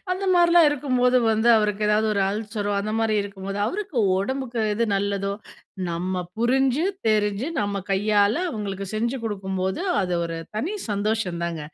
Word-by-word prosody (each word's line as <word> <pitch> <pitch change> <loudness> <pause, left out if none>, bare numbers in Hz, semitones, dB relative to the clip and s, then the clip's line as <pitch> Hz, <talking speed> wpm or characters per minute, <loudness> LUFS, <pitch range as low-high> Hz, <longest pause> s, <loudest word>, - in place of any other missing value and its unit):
அந்த 375 +2 -3
மாரிலாம் 345 -1 +6
இருக்கும்போது 255 -3 +1
வந்து 220 +2 +2
அவருக்கு 210 -1 +1
ஏதாவது 215 +1 +3
ஒரு 200 - +1
அல்சரோ, 205 0 -3
அந்த 215 +2 -3
மாரி 225 -1 +1
இருக்கும்போது 195 0 -6
அவருக்கு 380 - -4 0.2
உடம்புக்கு 245 +2 -2
எது 235 - +1
நல்லதோ 200 0 -1 0.6
நம்ம 180 +2 -2 0.2
புரிஞ்சு 265 +5 +2 0.2
தெரிஞ்சு 210 +3 +1
நம்ம 200 -1 -1 0.2
கையால, 205 +1 +3 0.2
அவுங்களுக்கு 200 -4 -4
செஞ்சு 235 +4 -1
குடுக்கும்போது 190 - -2 0.2
அது 180 -1 -1
ஒரு 165 0 -4 0.2
தனி 335 - -2 0.2
சந்தோஷந்தாங்க. 185 -6 -1
210 Hz, 140 wpm, -24 LUFS, 195-245 Hz, 0.6 s, மாரிலாம்